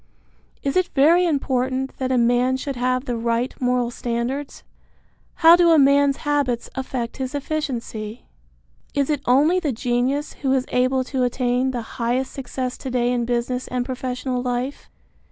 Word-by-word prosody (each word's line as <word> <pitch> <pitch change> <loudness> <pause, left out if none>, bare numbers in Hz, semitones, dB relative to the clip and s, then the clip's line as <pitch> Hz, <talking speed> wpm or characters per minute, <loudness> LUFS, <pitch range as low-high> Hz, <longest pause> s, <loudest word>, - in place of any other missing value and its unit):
Is 275 - -1
it 370 -1 +3
very 335 +6 +5
important 265 -3 -1
that 260 -1 -1
a 255 - +2
man 245 +2 +2
should 275 +1 -4
have 255 +1 0
the 245 - -2
right 235 +2 -1
moral 250 -1 +1
standards? 245 +4 -4 0.7
How 330 +1 +8
do 350 -1 +4
a 325 - +6
man's 280 0 +4
habits 285 -5 0
affect 255 -3 -4
his 265 +1 -4
efficiency? 250 -7 -4 0.7
Is 280 +1 +1
it 290 -3 -1
only 295 +9 +4
the 310 -6 -1
genius 250 +5 -1
who 270 -2 +1
is 260 -1 +1
able 255 +1 +1
to 260 0 -3
attain 250 +1 +1
the 245 -3 -3 0.2
highest 245 +3 0
success 255 -1 -4
to 265 - -5
day 245 -1 +1
in 240 -1 0
business 245 +1 -2
and 250 -1 -2
professional 255 -1 -3
life? 250 +2 -3
255 Hz, 160 wpm, -22 LUFS, 245-275 Hz, 0.7 s, How